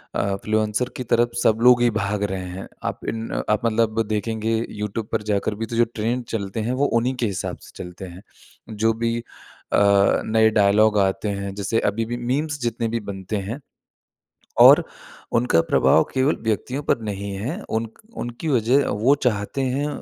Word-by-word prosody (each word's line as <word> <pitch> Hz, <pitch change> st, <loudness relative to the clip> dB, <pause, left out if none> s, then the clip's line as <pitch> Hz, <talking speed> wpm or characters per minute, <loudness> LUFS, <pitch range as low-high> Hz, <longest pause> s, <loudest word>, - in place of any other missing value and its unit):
अ, 100 Hz, -1 st, 0 dB
influencer 110 Hz, +3 st, 0 dB
की 125 Hz, -, -3 dB
तरफ 120 Hz, 0 st, +2 dB
सब 110 Hz, -, +4 dB
लोग 125 Hz, 0 st, +6 dB
ही 120 Hz, -, +4 dB
भाग 100 Hz, +1 st, -1 dB
रहे 95 Hz, -1 st, -3 dB
हैं। 95 Hz, +2 st, -7 dB, 0.2 s
आप -, -, -7 dB
इन 115 Hz, 0 st, -4 dB
अ, -, -, -2 dB
आप 105 Hz, +2 st, +1 dB
मतलब 115 Hz, 0 st, +1 dB
देखेंगे 110 Hz, +1 st, -1 dB
यूट्यूब 105 Hz, +1 st, -4 dB
पर -, -, 0 dB
जाकर 105 Hz, +1 st, 0 dB
भी 115 Hz, +2 st, -3 dB
तो 115 Hz, -, -6 dB
जो 120 Hz, +1 st, +4 dB
ट्रेंड 120 Hz, +3 st, -1 dB
चलते 100 Hz, 0 st, -3 dB
हैं -, -, 0 dB
वो -, -, +4 dB
उन्हीं 130 Hz, +2 st, -1 dB
के 125 Hz, -, -1 dB
हिसाब 100 Hz, -3 st, -4 dB
से -, -, -14 dB
चलते 90 Hz, +2 st, -9 dB
हैं। 90 Hz, +1 st, -11 dB, 0.5 s
जो 110 Hz, +1 st, +1 dB
भी 115 Hz, 0 st, +1 dB
अ, 120 Hz, -, -5 dB, 0.5 s
नए 110 Hz, 0 st, +4 dB
डायलॉग 105 Hz, 0 st, +4 dB
आते 95 Hz, +2 st, 0 dB
हैं 100 Hz, -1 st, -4 dB
जैसे 100 Hz, +3 st, 0 dB
अभी 115 Hz, +3 st, -2 dB
भी 120 Hz, +2 st, -4 dB
मीम्स 145 Hz, +5 st, -2 dB
जितने 115 Hz, -1 st, -1 dB
भी 115 Hz, +1 st, -2 dB
बनते 95 Hz, +2 st, -4 dB
हैं 125 Hz, +6 st, -4 dB, 1.0 s
और -, -, +9 dB, 0.5 s
उनका 115 Hz, -8 st, +3 dB
प्रभाव 80 Hz, -, +4 dB
केवल 135 Hz, +3 st, +2 dB
व्यक्तियों 120 Hz, +5 st, -2 dB
पर 120 Hz, -, 0 dB
नहीं 100 Hz, 0 st, -4 dB
है। 125 Hz, -, -4 dB, 0.2 s
उनक 115 Hz, 0 st, -8 dB, 0.2 s
उनकी 120 Hz, +7 st, -5 dB
वज़ह 130 Hz, +1 st, +3 dB
वो 130 Hz, +6 st, +5 dB
चाहते 105 Hz, +2 st, -1 dB
हैं 135 Hz, +3 st, -1 dB
110 Hz, 185 wpm, -22 LUFS, 105-120 Hz, 1.0 s, और